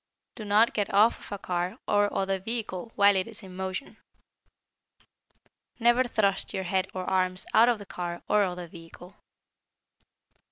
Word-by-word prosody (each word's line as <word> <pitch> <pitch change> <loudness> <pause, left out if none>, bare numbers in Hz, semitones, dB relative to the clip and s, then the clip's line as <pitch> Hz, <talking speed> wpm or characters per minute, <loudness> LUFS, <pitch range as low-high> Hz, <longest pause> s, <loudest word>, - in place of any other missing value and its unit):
Do 215 - -8
not 210 +3 +4
get 205 -2 -1
off 210 +4 +4
of - - -13
a 200 - -3
car 180 +2 -3
or 205 0 +2
other 195 0 -1
vehicle 225 -1 -5
while 200 -1 +5
it 190 +1 0
is 225 -1 -9
in 185 -1 -11
motion. 190 +6 -5 1.8
Never 240 +2 +4
thrust 200 -5 0
your 190 - -2
head 190 +1 0
or 185 - -3
arms 185 -1 0
out 235 +2 +6
of 240 - +2
the 205 - -10
car 175 -2 -6
or 210 - +3
other 180 -3 -2
vehicle. 170 +2 -13
195 Hz, 160 wpm, -27 LUFS, 185-215 Hz, 1.8 s, out